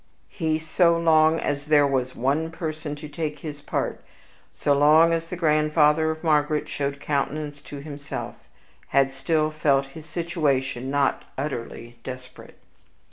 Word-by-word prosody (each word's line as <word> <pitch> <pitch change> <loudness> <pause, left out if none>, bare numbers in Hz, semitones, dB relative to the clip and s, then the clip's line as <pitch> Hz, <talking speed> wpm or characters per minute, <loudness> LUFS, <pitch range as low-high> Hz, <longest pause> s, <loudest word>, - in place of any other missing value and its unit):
He, 160 -4 -1
so 170 +2 +2
long 160 -1 +4
as 145 +1 -2
there 150 -1 +5
was 130 -2 -1
one 145 +6 0
person 155 -2 -5
to 150 +1 -9
take 150 0 -4
his 145 -2 -6
part, - - -3 0.5
so 145 - +1
long 155 +4 +6
as 165 0 -1
the 180 - -5
grandfather 155 -1 +3
of 160 +1 -4
Margaret 150 -1 +2
showed 140 0 -3
countenance 145 0 -2
to 145 -1 -9
himself, 145 -1 -6 0.5
had 135 0 +3
still 155 +3 0
felt 140 -3 +2
his 160 -1 -11
situation 145 -7 -1
not 140 -1 +1
utterly 120 -4 -5
desperate. 130 0 -9
150 Hz, 140 wpm, -24 LUFS, 140-160 Hz, 0.5 s, long